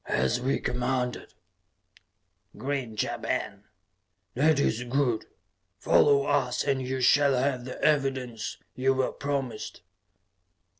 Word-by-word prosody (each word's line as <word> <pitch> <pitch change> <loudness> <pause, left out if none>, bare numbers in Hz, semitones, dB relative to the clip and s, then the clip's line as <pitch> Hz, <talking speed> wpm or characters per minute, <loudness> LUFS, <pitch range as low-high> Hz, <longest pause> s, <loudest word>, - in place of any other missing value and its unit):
"As 65 0 +1
we 135 +2 0
commanded," 125 0 -2 1.2
grinned 130 -6 -2
Ja - - -4
Ben. - - -3 0.7
"That 150 +3 +3
is 120 -4 +1
good. 125 -2 0 0.5
Follow 140 +7 +4
us 140 -4 +1
and 140 -2 0
you 130 0 -3
shall 140 +2 +4
have 130 -1 0
the 130 - -7
evidence 135 -6 0 0.2
you 135 +1 +1
were 130 0 0
promised." 140 -6 -4
130 Hz, 110 wpm, -27 LUFS, 125-140 Hz, 1.2 s, Follow